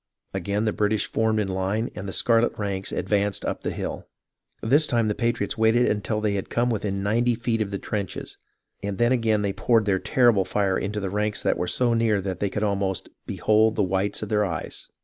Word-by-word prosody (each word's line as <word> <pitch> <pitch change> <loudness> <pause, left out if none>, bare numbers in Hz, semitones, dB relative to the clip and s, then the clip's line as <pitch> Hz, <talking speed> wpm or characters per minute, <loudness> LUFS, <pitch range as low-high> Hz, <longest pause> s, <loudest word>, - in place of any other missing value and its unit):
Again 100 +3 -1
the 110 - +1
British 105 0 +1
formed 110 -1 +1
in 105 - 0
line 95 +4 -1
and 100 0 -6
the - - -4
scarlet 115 +3 +2
ranks 100 -2 -3
advanced 100 0 0
up - - -3
the - - -2
hill. - - -5 0.6
This 145 +7 +4
time 115 -4 +1
the - - +1
patriots 115 -2 -1
waited 115 +2 +4
until 105 +1 0
they 105 -1 +1
had 100 -1 -3
come 120 +1 +1
within 100 -3 -2
ninety 120 +4 +2
feet 115 -1 -1
of 105 - -1
the 100 - -3
trenches, 100 -1 -4 0.5
then 100 +4 0
again 110 -4 +2
they 100 -1 0
poured 115 0 +2
their 95 -2 +2
terrible 120 -5 +3
fire 100 0 0
right - - -1
into 105 +2 -2
the 95 -2 -3
ranks 105 0 -1
that - - +2
were 90 - -2
so 120 +3 +1
near 115 -3 +2
that 95 -1 -4
they 100 - 0
could 105 +2 -3
almost 100 -2 -1
" - - -45
behold 110 +1 +2
the 105 - +2
whites 95 +2 -1
of - - -5
their 105 -1 +2
eyes." 85 -5 -4
105 Hz, 220 wpm, -25 LUFS, 100-115 Hz, 0.6 s, This